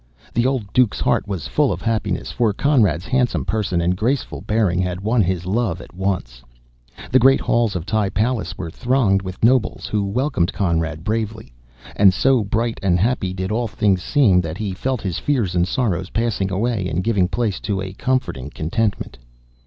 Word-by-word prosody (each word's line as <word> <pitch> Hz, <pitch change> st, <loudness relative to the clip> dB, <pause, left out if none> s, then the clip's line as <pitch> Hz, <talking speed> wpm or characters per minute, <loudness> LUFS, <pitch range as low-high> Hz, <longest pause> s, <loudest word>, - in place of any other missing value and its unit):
The 120 Hz, +2 st, +2 dB
old 125 Hz, -8 st, -2 dB
Duke's, 125 Hz, -5 st, +3 dB
heart -, -, +1 dB
was 90 Hz, -9 st, -4 dB
full -, -, +2 dB
of 90 Hz, -, -4 dB
happiness, 115 Hz, -2 st, -1 dB
for 115 Hz, -4 st, +1 dB
Conrad's 105 Hz, -, +2 dB
handsome 125 Hz, +1 st, 0 dB
person 100 Hz, -5 st, -1 dB
and 90 Hz, +2 st, +1 dB
graceful 120 Hz, +8 st, -1 dB
bearing 105 Hz, -3 st, +1 dB
had 90 Hz, 0 st, -2 dB
won 110 Hz, +3 st, +2 dB
his 90 Hz, -2 st, -1 dB
love 100 Hz, -2 st, -1 dB
at -, -, -12 dB
once. 90 Hz, -11 st, -3 dB, 0.7 s
The 130 Hz, -, +5 dB
great 135 Hz, +2 st, +5 dB
halls 115 Hz, -4 st, +1 dB
of 85 Hz, -2 st, -3 dB
the 105 Hz, -1 st, 0 dB
palace 115 Hz, +3 st, -1 dB
were 85 Hz, -3 st, -5 dB
thronged 120 Hz, -4 st, +1 dB
with 95 Hz, +1 st, -8 dB
nobles, 120 Hz, -1 st, +2 dB
who 105 Hz, -2 st, -1 dB
welcomed 100 Hz, -, 0 dB
Conrad 80 Hz, -4 st, -1 dB
bravely; 110 Hz, -, -3 dB, 0.4 s
and 95 Hz, -2 st, +5 dB
so 130 Hz, -2 st, +3 dB
bright 115 Hz, +3 st, -1 dB
and 90 Hz, -3 st, +2 dB
happy 105 Hz, -3 st, 0 dB
did 95 Hz, +1 st, -4 dB
all 115 Hz, +2 st, 0 dB
things 100 Hz, -2 st, +1 dB
seem, 105 Hz, -, +3 dB
that 85 Hz, -1 st, -5 dB
he 105 Hz, -3 st, -3 dB
felt 130 Hz, +5 st, -2 dB
his 95 Hz, -4 st, -3 dB
fears 120 Hz, -11 st, 0 dB
and 90 Hz, 0 st, +2 dB
sorrows 100 Hz, -5 st, -1 dB
passing 110 Hz, -4 st, -1 dB
away 105 Hz, -1 st, -1 dB
and 85 Hz, +4 st, -1 dB
giving 100 Hz, -4 st, +2 dB
place 110 Hz, 0 st, -1 dB
to 100 Hz, -2 st, -2 dB
a 95 Hz, 0 st, -5 dB
comforting 115 Hz, -, -2 dB
contentment. 95 Hz, -, -2 dB
100 Hz, 185 wpm, -20 LUFS, 90-115 Hz, 0.7 s, The